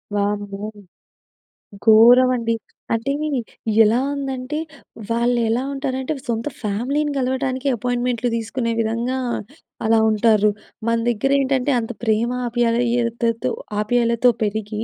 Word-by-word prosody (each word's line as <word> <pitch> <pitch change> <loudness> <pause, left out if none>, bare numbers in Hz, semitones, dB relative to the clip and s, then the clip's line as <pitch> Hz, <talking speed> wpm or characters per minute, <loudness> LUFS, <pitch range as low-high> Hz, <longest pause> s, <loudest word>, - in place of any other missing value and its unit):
వామ్మో! 205 0 -2 1.2
ఘోరవండి! 235 +1 +6 0.4
అంటే, 230 +4 -1 0.7
ఎలా 220 +3 +3
ఉందంటే, 270 +1 -3 0.5
వాళ్ళెలా 235 0 +1
ఉంటారంటే, 265 0 -2
సొంత 230 +1 -2
ఫ్యామిలీని 255 +9 -1
కలవటానికే 260 +1 -1
ఎపాయింట్‌మెంట్‌లు 245 0 -1
తీసుకునే 230 +1 -2
విధంగా, 230 +3 -1 0.7
అలా 225 0 +4
ఉంటారు. 215 -1 +3 0.4
మన 230 - +2
దగ్గరేంటంటే, 270 +3 +1
అంత 225 0 -4
ప్రేమ 225 +1 +1 0.2
ఆప్యాయతతో 235 -1 0 0.3
ఆప్యాయలతో 235 +2 +3
పెరిగి, 215 +1 -2
235 Hz, 90 wpm, -21 LUFS, 225-255 Hz, 1.2 s, ఘోరవండి